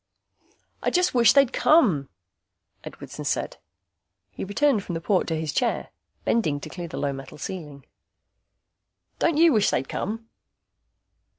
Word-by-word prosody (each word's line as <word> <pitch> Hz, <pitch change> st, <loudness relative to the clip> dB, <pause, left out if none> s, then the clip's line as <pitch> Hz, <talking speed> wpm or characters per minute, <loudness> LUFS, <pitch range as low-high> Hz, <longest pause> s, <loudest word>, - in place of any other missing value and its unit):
"I -, -, +1 dB
just 360 Hz, 0 st, +2 dB
wish 235 Hz, -4 st, +6 dB
they'd 275 Hz, -3 st, +4 dB
come," 195 Hz, -, +3 dB, 0.7 s
Edwardson -, -, -9 dB
said. -, -, -2 dB, 0.7 s
He -, -, -6 dB
returned 220 Hz, +2 st, +1 dB
from 175 Hz, -, -5 dB
the -, -, -2 dB
port 185 Hz, +3 st, +1 dB
to 160 Hz, -1 st, -1 dB
his 155 Hz, -2 st, -3 dB
chair, 245 Hz, -2 st, 0 dB, 0.4 s
bending 155 Hz, -11 st, +1 dB
to -, -, -7 dB
clear 175 Hz, -2 st, -6 dB
the 165 Hz, -, -7 dB
low 140 Hz, -1 st, -1 dB
metal 135 Hz, +1 st, -9 dB
ceiling. 150 Hz, -5 st, -7 dB, 1.3 s
"Don't 330 Hz, -3 st, +2 dB
you 330 Hz, -1 st, +6 dB
wish 215 Hz, -3 st, +3 dB
they'd 130 Hz, +2 st, -1 dB
come?" 225 Hz, +3 st, -4 dB
195 Hz, 140 wpm, -25 LUFS, 150-250 Hz, 1.3 s, wish